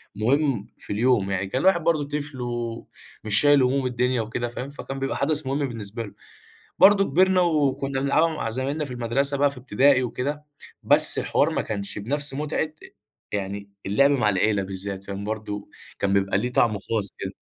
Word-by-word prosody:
مهم 125 0 0
في - - -7
اليوم، 105 -3 +1
يعني 95 0 -2
كان 130 +7 -2
الواحد 185 -3 +3
برضه 160 -3 +1
طفل 145 -2 -5
ومش 115 -3 -3
شايل 145 -2 +5
هموم 130 +1 +1
الدنيا 125 -1 0
وكده 115 +2 -3
فاهم، 125 +3 -6
فكان 135 -1 -7
بيبقى 135 0 -2
حدث 150 +1 -1
مهم 140 +1 -1
بالنسبة 115 -1 -6
له. 100 - -10 0.7
برضه 195 0 +6
كبِرنا 185 +3 +3
وكنّا 140 -5 0
نلعبها 155 +4 +2
مع 155 -8 -4
زمايلنا 135 +6 -2
في 140 - -7
المدرسة 125 +4 -1
بقى 140 +1 +2
في 140 - -12
إبتدائي 130 +2 +3
وكده، 145 +5 -4 0.4
بس - - +6
الحوار - - +1
ما - - -1
كانش 100 -1 -5
بنفس 140 +7 +3
متعة 150 +2 -2 0.6
يعني 100 0 -4 0.2
اللعب 140 +9 +3
مع 125 -7 +2
العيلة 100 +1 +1
بالذات 95 0 -5
كان 100 0 -6
برضه، 105 -1 -5 0.3
كان 100 - 0
بيبقى 100 0 +1
ليه 125 +4 -3
طعم 120 -2 +3
خاص 105 0 -1
كده. - - -5
125 Hz, 175 wpm, -24 LUFS, 105-145 Hz, 0.7 s, برضه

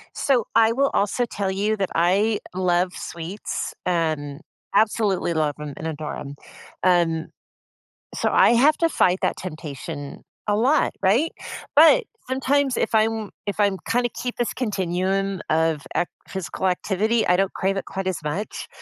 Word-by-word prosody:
So, 250 -6 +1
I 225 0 +5
will 275 +3 +2
also 205 +5 +1
tell 200 -4 -3
you 205 +3 0
that 195 -3 -2
I 195 +6 +2 0.2
love 180 0 +1
sweets, 170 +5 -5
um, 155 -5 -1 0.3
absolutely 205 -5 +2
love 155 -2 0
'em 145 -2 -6
and 160 - -6
adore 155 -1 -4
'em, 140 0 -7 0.5
um 170 -3 +2 0.9
so, - - +1
I - - +6
have 280 +6 +5
to 335 - +3
fight 185 - +2
that - - +1
temptation 145 -4 -7 0.2
a 205 - +2
lot, 255 +8 +2
right? 225 +12 +2 0.4
But 330 +11 +7 0.2
sometimes 270 +1 +1
if - - 0
I'm 220 -1 +1
if 205 +1 -4
I'm 200 -2 +3
kinda 245 +1 +2
keep 245 +1 -5
this 240 - -1
continuum 195 -3 -1
of 160 -1 +2
ac 175 - +1 0.2
physical 190 0 -3
activity, 215 +5 +1
I 180 - +4
don't 195 0 +1
crave 195 +1 0
it - - -2
quite 195 -1 -4
as 185 - -1
much. 170 +8 -4
195 Hz, 155 wpm, -23 LUFS, 170-225 Hz, 0.9 s, But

